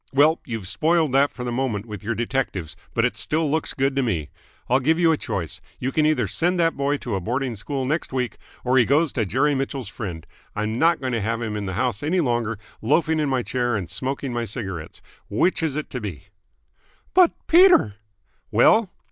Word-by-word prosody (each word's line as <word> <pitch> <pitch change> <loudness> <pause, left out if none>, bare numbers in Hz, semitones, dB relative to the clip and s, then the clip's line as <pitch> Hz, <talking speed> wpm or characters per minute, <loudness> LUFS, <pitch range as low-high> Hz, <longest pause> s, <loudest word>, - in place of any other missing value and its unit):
Well, 150 +4 +4
you've 110 -6 -4
spoiled 160 - +2
that 140 +2 +4
for 125 - -8
the 120 - -3
moment 120 -5 -1
with 105 -4 -7
your 115 +2 -2
detectives, 115 - -2 0.2
but 115 - +3
it 125 - -1
still 160 +1 0
looks 160 0 -1
good 135 0 +1
to 135 - +2
me. 90 - -2 0.4
I'll 130 +2 +3
give 160 +5 +2
you 170 -1 +4
a - - +3
choice. 90 - -4 0.2
You 130 - -2
can 155 +1 +2
either 155 - +1
send 175 +2 0
that 165 -1 +2
boy 140 +1 0
to 120 -5 -5
a 95 - 0
boarding 125 +5 -2
school 130 +6 -3
next 150 +4 -1
week, 125 -2 -2 0.3
or 130 +1 +4
he 120 - +5
goes 150 +3 +2
to 110 -5 0
Jerry 135 +9 +2
Mitchell's 135 -4 -3
friend. 90 -9 -6 0.3
I'm 110 +2 -2
not 165 0 +4
going 130 -2 -3
to 115 - 0
have 115 +3 -1
him 110 -2 -3
in 105 -2 -3
the 95 - -3
house 120 0 -1
any 165 +5 +1
longer, 120 -7 0 0.2
loafing 155 +6 +2
in 150 -2 +1
my 130 -2 0
chair 120 -2 -1
and 95 -4 -3
smoking 130 +6 -3
my 120 0 -1
cigarettes. 95 -7 -6 0.3
Which 175 - +1
is 160 -4 -1
it 155 - -4
to 125 - -4
be?" 95 -9 -7 0.8
"But, 365 -2 +6
Peter!" 345 - +6
130 Hz, 210 wpm, -23 LUFS, 110-150 Hz, 0.8 s, But